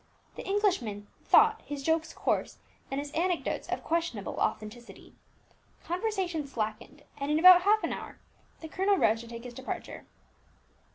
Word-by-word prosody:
The - - -9
Englishmen 360 - 0 0.2
thought 445 0 +5
his 285 -1 -6
jokes 320 +2 0
coarse, - - -1 0.3
and 270 - -2
his 285 0 -6
anecdotes 350 +2 -1
of - - -3
questionable 325 - -2
authenticity. 230 +3 -4 0.7
Conversation 360 -4 -2
slackened, 235 +3 -5 0.2
and 280 +1 -3
in 300 - +2
about 360 +2 +9
half 420 +3 +3
an - - -1
hour - - -8 0.4
the 320 - -7
colonel 385 +4 +1
rose 225 -8 +3
to 235 - -11
take 235 0 -8
his 245 -1 -8
departure. 260 +2 -7
315 Hz, 150 wpm, -29 LUFS, 240-370 Hz, 0.7 s, about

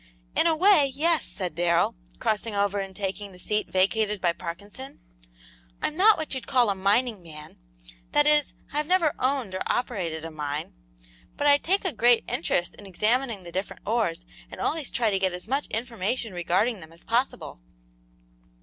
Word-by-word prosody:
"In - - +5
a 325 - +3
way, 315 -5 +5
yes," 325 +2 +2
said 180 -4 -4
Darrell, 170 +1 +2 0.2
crossing 215 0 -1
over 200 0 +1
and 195 -1 -6
taking 200 +1 -4
the - - -13
seat 210 +3 -1
vacated 210 +2 +1
by 175 -2 +1
Parkinson. 170 - -8 0.8
"I'm 305 - -2
not 415 +5 +6
what 315 -3 -3
you 260 - -3
call 245 -5 +2
a - - -2
mining 205 +3 +1
man; 155 - -11 0.5
that 295 - +4
is, 300 -1 +3 0.2
I've 300 0 0
never 345 -4 +3
owned 255 -6 0
or 185 - -4
operated 175 -10 -2
a 165 - -6
mine, 150 -1 -3 0.6
but 290 - -1
I 285 0 +6
take 385 +6 0
a 365 - 0
great 240 0 +4
interest 175 0 -1
in 205 - -11
examining 220 +2 0
the 170 - -9
different 190 +3 -5
ores 195 -6 -1 0.2
and - - -10
always 310 -4 0
try 230 -3 +1
to 195 - +1
get 190 -1 +1
as 180 +3 -6
much 275 +4 -1
information 225 -1 -3
regarding 185 +6 0
them 160 -1 -13
as 165 +1 -13
possible." 235 - -2
210 Hz, 175 wpm, -26 LUFS, 180-270 Hz, 0.8 s, not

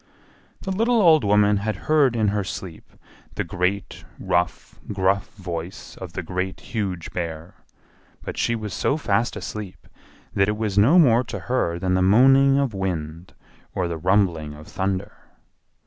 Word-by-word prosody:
The 190 - -4
little 230 +5 +2
old 160 - +5
woman 105 0 +4
had 105 +1 -2
heard 145 -6 +3
in 110 -3 +2
her 105 0 -1
sleep 90 -3 -8 0.4
the - - -1
great, 90 +3 -2
rough, 85 -1 -2
gruff 95 0 +1
voice 90 -1 -7
of 90 -3 -9
the 90 - -4
Great, 90 +2 -3
Huge 95 -7 -4
Bear, 85 -1 -5 0.7
but - - -6
she 115 - 0
was 105 -3 -5
so 140 - 0
fast 115 -5 0
asleep 105 -4 -7 0.5
that 100 +1 +2
it 105 - -1
was 105 -3 -2
no 115 - +5
more 125 -7 +5
to - - -6
her 120 -9 -1
than 90 +1 -1
the 95 - +2
moaning 135 +8 +5
of 140 -5 0
wind 85 -3 -4 0.4
or 90 - 0
the 85 -1 -4
rumbling 85 -5 +1
of 75 +1 -13
thunder. 95 +1 -3
100 Hz, 160 wpm, -23 LUFS, 90-115 Hz, 0.7 s, old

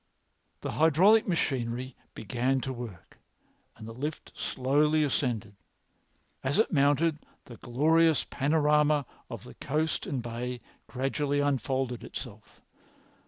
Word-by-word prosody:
The - - -3
hydraulic 175 +8 +5
machinery 130 -7 -1
had - - -34
begun 125 +5 0
to 130 - -3
work 120 -8 -9 0.6
and 110 - -9
the 115 - -7
lift 145 +6 -5
very - - -18
slowly 150 +4 +2
ascended. 120 -7 -1 0.9
As 135 +6 0
it 220 -2 +2
mounted, 150 +2 +3 0.3
the 120 -4 -11
glorious 155 +7 +3
panorama 150 0 +2 0.2
of - - -7
the - - -11
coast 155 +3 -2
and 130 -4 -2
bay 120 +1 -4 0.3
gradually 140 +2 -1
unfolded 135 -3 -1
itself. - - -9
140 Hz, 120 wpm, -29 LUFS, 125-150 Hz, 0.9 s, hydraulic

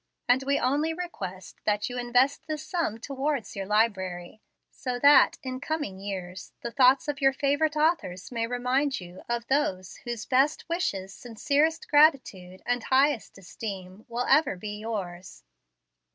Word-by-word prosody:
And 250 +2 +4
we 280 - +3
only 295 +6 0
request 190 - -7
tint 210 0 0
you 245 - -6
invest 250 +3 +1
this 310 -1 -4
sum 335 - -2
towards 275 -1 -3
your 195 -1 -4
library, 200 -3 -1 0.3
so 250 -2 -4
that, 285 +3 +6
in 255 -1 -4
coming 295 -12 -3
years, 185 -2 -6
the 235 - -4
thoughts 265 +3 +4
of 290 -1 -3
your 270 0 +4
favorite 285 +3 +1
authors 300 - 0
may 230 -1 -1
remind 250 +3 0
you 180 0 -11
of 235 -1 -1
those 195 -10 -1
whose 240 -3 -6
best 275 +4 +2
wishes, 200 - -2
sincerest 295 - 0
gratitude, 255 - +2
and 245 -1 -1
highest 265 -4 +2
esteem 190 +1 -8
Will 240 +1 -2
ever 300 -6 +3
be 210 +3 -6
yours. 190 -5 -6
245 Hz, 150 wpm, -27 LUFS, 195-285 Hz, 0.3 s, that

